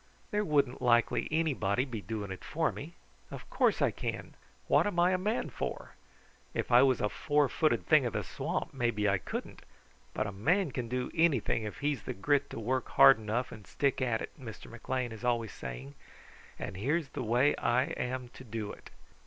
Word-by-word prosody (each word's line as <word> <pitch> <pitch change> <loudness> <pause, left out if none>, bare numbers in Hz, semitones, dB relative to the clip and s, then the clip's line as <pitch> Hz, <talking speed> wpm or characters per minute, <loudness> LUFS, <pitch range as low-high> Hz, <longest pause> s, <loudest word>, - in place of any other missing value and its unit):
There 210 0 +1
wouldn't 140 -7 +1
likely 120 -2 +3
anybody 135 -8 +1
be 115 -6 -6
doing 105 -2 -5
it 95 - -7
for 160 0 0
me. 165 +4 -9 0.3
Of - - -9
course - - +2
I - - +3
can! - - -5 0.3
What - - +4
am 200 -4 -3
I 175 +1 +5
a 185 - +2
man 210 +5 -1
for? - - -5 0.6
If - - -2
I 120 +1 +8
was 130 -2 +3
a 105 - +2
four 145 +6 +1
footed 155 +3 +1
thing 150 -5 +5
of 115 - -5
the - - -1
swamp, - - -3
maybe 120 -5 0
I 100 -1 +2
couldn't; - - -6 0.5
but - - 0
a 105 - -3
man 160 - +1
can 125 -2 -3
do 125 0 -2
anything 140 -9 +2
if 105 - -7
he's 145 -5 0
the - - -5
grit 140 +7 +1
to - - -6
work 125 +3 -1
hard 70 +10 +7
enough 115 +4 -2
and 105 -4 -11
stick 140 -2 0
at 120 -3 0
it, - - -6
Mr. 115 -3 -9
McLean 120 +1 -3
is 110 +1 -9
always 120 -3 0
saying, 65 +2 -7 0.6
and 90 - -6
here's 140 - 0
the - - -5
way 125 +5 +3
I 120 +2 +2
am 125 -2 -3
to 130 - -13
do 110 -3 -5
it. - - -12
125 Hz, 200 wpm, -31 LUFS, 110-145 Hz, 0.6 s, I